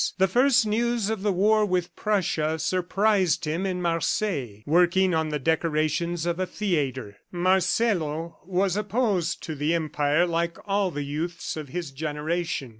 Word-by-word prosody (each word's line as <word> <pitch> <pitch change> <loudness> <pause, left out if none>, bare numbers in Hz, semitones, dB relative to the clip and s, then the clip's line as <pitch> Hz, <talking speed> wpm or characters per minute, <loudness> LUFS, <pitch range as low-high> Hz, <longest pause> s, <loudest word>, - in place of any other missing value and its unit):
The 190 - +4
first 250 +4 +4
news 225 0 0
of 220 -3 -3
the 205 0 +1
war 210 +4 +3
with 180 -3 -1
Prussia 160 -7 0
surprised 185 0 +1
him 165 +6 -1
in 180 -1 -3
Marseilles, 165 - -1
working 180 +3 +3
on 160 -1 0
the 150 - -1
decorations 160 +2 0
of 170 +1 -1
a 185 - 0
theatre. 135 - -2
Marcelo 175 -3 0
was 185 +1 0
opposed 210 -4 0
to 160 - -4
the 150 +3 0
Empire 155 0 +1
like 170 0 -1
all 200 -1 +1
the 145 -3 -4
youths 165 +5 -4
of 155 -2 -6
his 170 -1 -5
generation. 150 0 -3
175 Hz, 150 wpm, -25 LUFS, 155-195 Hz, -, The